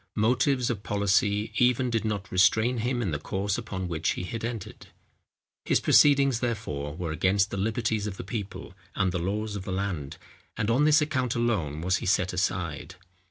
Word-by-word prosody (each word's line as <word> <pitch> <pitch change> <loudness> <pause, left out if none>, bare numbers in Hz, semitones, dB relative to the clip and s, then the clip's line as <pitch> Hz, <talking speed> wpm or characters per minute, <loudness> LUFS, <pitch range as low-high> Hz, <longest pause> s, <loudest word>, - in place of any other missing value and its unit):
Motives 125 +3 +2
of 105 -4 -4
policy 100 +1 +1
even 125 0 +3
did 115 -2 0
not 105 -3 -3
restrain 110 +6 +3
him 120 +1 -1
in 95 - -1
the 75 - -2
course 100 +5 -2
upon 95 -5 -5
which 85 -2 -1
he - - -5
had 110 +5 -5
entered. 115 -4 -6 0.8
His - - +2
proceedings, 140 -4 +5
therefore, 75 - -3
were 85 -1 -4
against 95 +5 +1
the - - -3
liberties 110 +1 -1
of 95 -2 -6
the - - -6
people, 105 0 -6 0.2
and 95 -1 +1
the 90 - -2
laws 105 +4 -2
of 100 - -5
the 95 - -5
land; 95 -7 -3 0.4
and 110 +2 0
on 135 +6 +3
this 155 +1 +5
account 130 -5 -1
alone 100 -11 -1
was 90 +2 +1
he - - -5
set 95 -1 +1
aside. 90 -4 -2
105 Hz, 185 wpm, -27 LUFS, 95-120 Hz, 0.8 s, proceedings